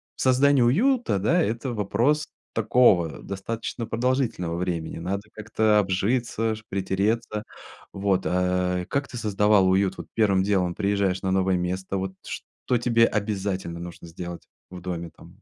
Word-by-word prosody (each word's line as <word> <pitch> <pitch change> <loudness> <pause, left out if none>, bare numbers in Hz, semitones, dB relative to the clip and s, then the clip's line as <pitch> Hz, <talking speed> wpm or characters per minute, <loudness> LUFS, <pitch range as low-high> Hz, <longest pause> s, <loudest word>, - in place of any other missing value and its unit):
создание 130 +1 +4
уюта, 225 - +2
да, 165 - +2
это 120 -1 -1
вопрос 120 +8 +1 0.3
такого 105 -7 +3
достаточно 115 +4 -4
продолжительного 115 -8 -1
времени. 85 -2 -3
Надо 95 +4 -3
как-то 110 0 +1
обжиться 110 +3 0
ж, 110 - -12
притереться. 105 +3 -1 0.5
Вот, 95 -1 0
а. 90 0 0
Как 140 +6 -2
ты 125 - -7
создавала 105 -2 +3
уют? 95 +1 +2
Вот - - -8
первым 100 -4 +3
делом 95 -3 +1
приезжаешь 100 -1 0
на 95 - -1
новое 95 -1 +2
место. 95 +2 -2
Вот 95 0 -3
что 125 - -3
тебе 115 -1 +4
обязательно 100 -5 -2
нужно 85 0 -9
сделать 85 +1 -8 0.2
в 90 - -8
доме 85 -2 -4
там? 85 +5 -18
100 Hz, 140 wpm, -25 LUFS, 90-115 Hz, 0.5 s, создание